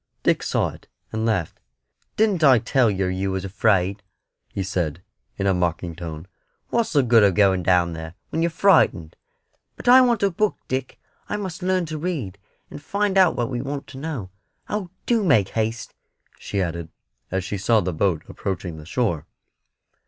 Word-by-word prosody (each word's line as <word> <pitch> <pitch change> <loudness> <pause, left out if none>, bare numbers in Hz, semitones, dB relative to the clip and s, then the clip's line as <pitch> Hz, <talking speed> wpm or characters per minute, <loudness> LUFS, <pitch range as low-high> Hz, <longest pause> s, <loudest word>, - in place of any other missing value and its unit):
Dick - - +2
saw - - 0
it, - - -14 0.2
and 110 +1 -1
laughed. 95 -8 -1 0.6
"Didn't 205 -6 +2
I 135 -4 +7
tell 120 +1 +2
yer 95 -2 -1
you 95 +1 -2
was 95 0 -3
afraid," 100 0 +1 0.5
he 100 - -3
said, 90 -3 -2 0.3
in 100 - -2
a 95 - +3
mocking 85 -1 -1
tone; 80 -1 -7 0.4
"what's 235 -6 0
the 140 -3 +4
good 120 -2 +5
of 100 -3 +4
going 95 -3 +4
down 90 -1 +2
there, 80 +1 -7 0.2
when 160 - -1
you're 170 - +2
frightened?" 160 - +3 0.6
"But - - -10
I 255 +2 +9
want 240 -5 +2
a 200 - +3
book, 210 +4 0
Dick; 130 0 -3 0.3
I 210 - -1
must 190 -4 -5
learn 185 -1 +1
to 155 -1 -5
read, 140 - -4 0.3
and - - -8
find 200 +5 -1
out 185 -3 +5
what 120 +1 -2
we 120 -1 -2
want 140 +1 -5
to 135 - -9
know. 135 -11 -5 0.4
Oh, 205 -4 -3 0.2
do 230 -3 +2
make 115 - +3
haste!" 115 +1 -2 0.5
she 100 -2 -2
added, 85 -2 -4 0.4
as 95 0 -1
she 100 +2 -4
saw 110 +3 +3
the 90 -2 -2
boat 85 -1 0
approaching 90 -4 -4
the 75 0 -11
shore. 95 - -1
110 Hz, 180 wpm, -23 LUFS, -, 0.6 s, I